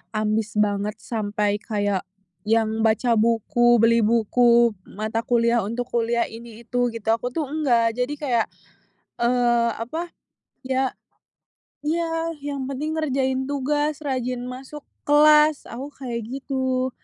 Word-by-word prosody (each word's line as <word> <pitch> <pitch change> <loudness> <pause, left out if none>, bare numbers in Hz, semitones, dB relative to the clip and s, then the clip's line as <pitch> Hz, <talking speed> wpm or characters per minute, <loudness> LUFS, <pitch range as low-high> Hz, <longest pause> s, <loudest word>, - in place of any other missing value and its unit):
ambis 215 0 -1
banget 210 0 0
sampai 210 -2 -1
kayak 205 -3 -2 0.4
yang 220 0 +2
baca 225 +2 +2
buku, 235 +2 +3
beli 230 +1 +4
buku 235 +1 +4 0.2
mata 215 +2 -3
kuliah 235 0 +2
untuk 235 +4 -3
kuliah 235 0 +1
ini 230 0 -11
itu 245 -1 0
gitu 225 -1 -9
aku 245 +2 -4
tuh 305 +1 -2
enggak 240 -6 +1
jadi 250 +3 -1
kayak, 245 -6 +1 0.8
eee, 240 -1 +3
apa 320 +10 -4 0.5
ya 260 0 0 0.9
iya 330 +1 -1
yang 280 -2 -4
penting 305 +4 -3
ngerjain 265 -3 0
tugas, 290 +2 -1
rajin 255 -3 -2
masuk 265 +3 -8 0.2
kelas 300 0 +5
aku 260 +4 -6
kayak 240 -3 -4
gitu. 260 0 -2
240 Hz, 125 wpm, -23 LUFS, 225-275 Hz, 0.9 s, kelas